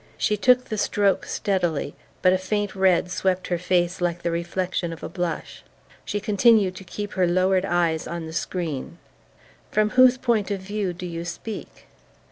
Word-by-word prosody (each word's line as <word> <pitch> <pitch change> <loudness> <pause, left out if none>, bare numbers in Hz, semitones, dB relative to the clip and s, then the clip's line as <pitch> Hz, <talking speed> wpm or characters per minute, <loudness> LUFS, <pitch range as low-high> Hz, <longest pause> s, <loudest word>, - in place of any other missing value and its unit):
She 210 - +1
took 250 +4 +4
the 215 -3 -4
stroke 200 -1 +1
steadily, 175 -8 -1 0.3
but 185 0 +6
a 185 - +1
faint 205 +1 -2
red 185 -2 +2
swept 185 0 -1
her 175 -1 0
face 180 0 0
like 175 -1 -1
the 170 - 0
reflection 175 +1 -2
of 165 - -9
a - - -4
blush. 175 -4 -4 0.4
She 205 - -2
continued 205 -2 +3
to 190 - -9
keep 205 +2 -6
her 185 -1 +2
lowered 185 +2 +2
eyes 170 -4 0
on 170 -1 -5
the 160 - -8
screen. 170 -3 -3 0.7
"From 215 0 +1
whose 255 0 +6
point 235 -6 0
of 200 -1 -2
view 195 0 -3
do 175 +1 -7
you 170 -1 -5
speak?" 210 +5 -7
185 Hz, 175 wpm, -24 LUFS, 175-205 Hz, 0.7 s, but